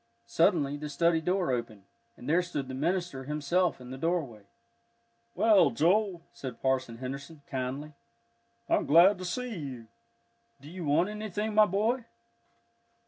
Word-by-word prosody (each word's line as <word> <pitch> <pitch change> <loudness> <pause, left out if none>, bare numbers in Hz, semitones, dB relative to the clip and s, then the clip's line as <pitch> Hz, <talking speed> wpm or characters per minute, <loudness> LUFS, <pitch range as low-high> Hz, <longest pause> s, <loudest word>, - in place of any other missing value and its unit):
Suddenly 145 0 +2
the 150 +1 -6
study 165 +3 +2
door 180 -2 0
opened, 115 -5 -4 0.3
and 125 - -11
there 165 +4 +3
stood 160 -7 -4
the 130 - -6
minister 165 -1 -2
himself 150 +3 0
in 125 0 -10
the 130 - -7
doorway. 140 - -2 0.9
"Well, 210 -8 +5
Joel," 175 - +1
said 130 -4 -7
Parson 130 -3 -1
Henderson, 140 +4 -7
kindly, 135 +3 -4 0.7
"I'm - - +1
glad 180 +6 +6
to 185 - -5
see 245 +6 -3
you. 130 - -7 0.7
Do 145 +3 -12
you 180 -2 -6
want 160 +6 +2
anything, 215 0 -3
my 215 0 +6
boy?" 225 +6 0
155 Hz, 140 wpm, -29 LUFS, 130-185 Hz, 0.9 s, glad